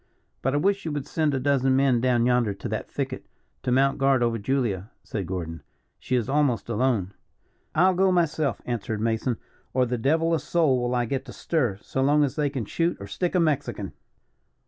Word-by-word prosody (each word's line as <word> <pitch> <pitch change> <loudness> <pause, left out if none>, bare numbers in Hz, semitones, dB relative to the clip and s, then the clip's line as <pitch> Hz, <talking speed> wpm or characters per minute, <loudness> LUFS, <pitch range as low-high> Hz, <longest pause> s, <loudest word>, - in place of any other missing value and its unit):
"But 135 +2 0
I - - +3
wish 200 +6 +1
you 160 - -3
would 145 -2 -3
send 155 -3 0
a - - 0
dozen 135 -1 +2
men 130 -3 +3
down 120 -2 +2
yonder 120 -5 +2
to - - -6
that - - -4
thicket, - - -4 0.3
to 125 - -1
mount 135 +2 +3
guard 135 -2 +3
over 115 -1 0
Julia," 105 -4 -1
said 100 -5 -4
Gordon. 85 -3 -4 0.4
"She 130 - -1
is 120 -2 0
almost 135 -6 +1
alone." 110 -5 0 0.6
"I'll 185 +4 +5
go 190 +1 +3
myself," 155 - 0
answered 110 -3 -3
Mason, 115 +2 0 0.4
"or 130 -1 +4
the 125 0 -2
devil 160 +7 +2
a 165 - +2
soul 150 -8 +2
will 120 +1 0
I 120 -1 +1
get 135 +3 -3
to - - -9
stir, 125 - 0
so 135 - -2
long 145 +2 +4
as 140 - -1
they 150 -2 +1
can 135 -5 -4
shoot 170 - 0
or 100 - -7
stick 175 - -2
a - - +4
Mexican. 140 - -1
130 Hz, 205 wpm, -25 LUFS, 115-150 Hz, 0.6 s, I'll